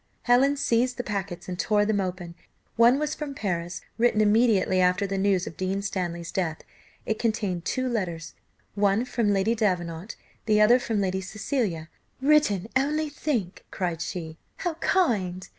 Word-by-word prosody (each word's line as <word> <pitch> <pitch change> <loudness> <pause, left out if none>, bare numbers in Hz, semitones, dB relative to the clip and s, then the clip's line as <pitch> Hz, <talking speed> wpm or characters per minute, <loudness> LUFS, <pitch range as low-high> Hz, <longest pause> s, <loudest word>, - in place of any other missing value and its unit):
Helen 265 +4 +4
seized 245 -2 +1
the 245 - -2
packets 195 -5 -4
and 180 -1 -5
tore 205 0 +2
them 210 -1 +1
open; 180 -2 -5 0.4
one 235 +3 +5
was 300 +1 -1
from 295 -3 -6
Paris, 175 -5 -3 0.2
written 235 -2 +3
immediately 210 -3 +3
after 180 +2 +2
the 195 0 -3
news 195 -2 +1
of - - -7
Dean 190 +3 -2
Stanley's 175 -4 -3
death; 165 -4 -2 0.4
it 220 - -2
contained 205 -6 -1
two 255 0 -1
letters, 175 -9 -3 0.4
one 205 +3 +2
from 235 -4 0
Lady 200 +3 +2
Davenant, 180 -4 -2 0.3
the 210 -1 +4
other 230 +4 +6
from 225 -4 -1
Lady 190 0 -1
Cecilia 195 - -2 0.3
"written, 265 -9 +3
only 300 +3 +1
think!" 255 - -3
cried 175 -3 -3
she, 160 -2 -5 0.2
"how 350 - -2
kind! 195 - +1
205 Hz, 160 wpm, -26 LUFS, 180-240 Hz, 0.4 s, other